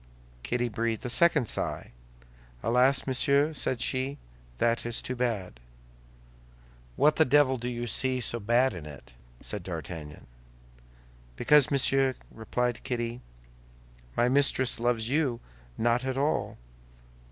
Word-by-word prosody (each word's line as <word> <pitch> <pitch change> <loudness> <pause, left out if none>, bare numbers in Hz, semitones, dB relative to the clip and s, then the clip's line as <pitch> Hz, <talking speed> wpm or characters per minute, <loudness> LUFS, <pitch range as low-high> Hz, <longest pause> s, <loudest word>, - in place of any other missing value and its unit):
Kitty 120 - -1
breathed 115 +2 -3
a 125 - -1
second 150 -2 +4
sigh. - - -2 0.7
"Alas, 125 +4 +3
monsieur," 140 +3 +2
said 130 -3 -1
she, 130 +3 -1 0.4
"that 115 - +1
is 120 -1 -2
too 130 - -4
bad." 110 - -3 1.4
"What 150 +1 +3
the 160 - +6
devil 140 -2 +3
do 120 +1 -4
you 120 0 -4
see 130 +2 -1
so 120 -1 -3
bad 120 +4 +2
in 80 -4 -8
it?" 70 -4 -12 0.3
said 105 - -5
D'Artagnan. 80 -3 -8 1.1
"Because, 150 - +4
monsieur," 135 -1 +3 0.2
replied 120 +2 -3
Kitty, 120 0 -3 1.0
"my 120 - +3
mistress 130 -2 +2
loves 115 -1 0
you 135 -3 0 0.4
not 120 +2 +1
at 130 0 -3
all." 145 +3 -1
125 Hz, 125 wpm, -28 LUFS, 115-135 Hz, 1.4 s, the